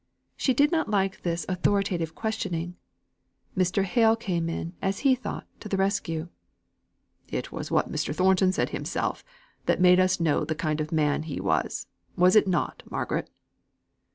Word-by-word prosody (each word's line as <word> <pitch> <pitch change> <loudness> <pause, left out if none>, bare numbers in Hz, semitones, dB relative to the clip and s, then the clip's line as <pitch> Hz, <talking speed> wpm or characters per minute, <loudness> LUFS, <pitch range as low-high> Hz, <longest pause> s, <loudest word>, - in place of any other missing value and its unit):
She 260 - +1
did 290 +4 +4
not 320 -7 +1
like 195 -2 0
this 170 -2 -2
authoritative 185 -3 0
questioning. 180 -6 -3 0.8
Mr. 185 +1 +2
Hale 225 +3 +4
came 175 -7 -2
in, 165 +1 -4
as 195 0 -1
he 270 - +7
thought, 255 -3 -4
to 210 - -8
the 195 - 0
rescue. 175 -4 -1 1.0
"It - - -4
was - - -5
what - - +1
Mr. - - -2
Thornton 185 +3 +3
said - - -1
himself, - - -2 0.4
that - - +2
made 180 0 +6
us 185 0 +3
know 165 -3 +2
the 160 - -2
kind 155 -1 -1
of 155 - -4
man 150 -3 +2
he 155 -2 -5
was. - - -1 0.3
Was 180 +2 +5
it 215 - +6
not, 180 -2 -1
Margaret?" - - -2
185 Hz, 160 wpm, -27 LUFS, 165-200 Hz, 1.0 s, he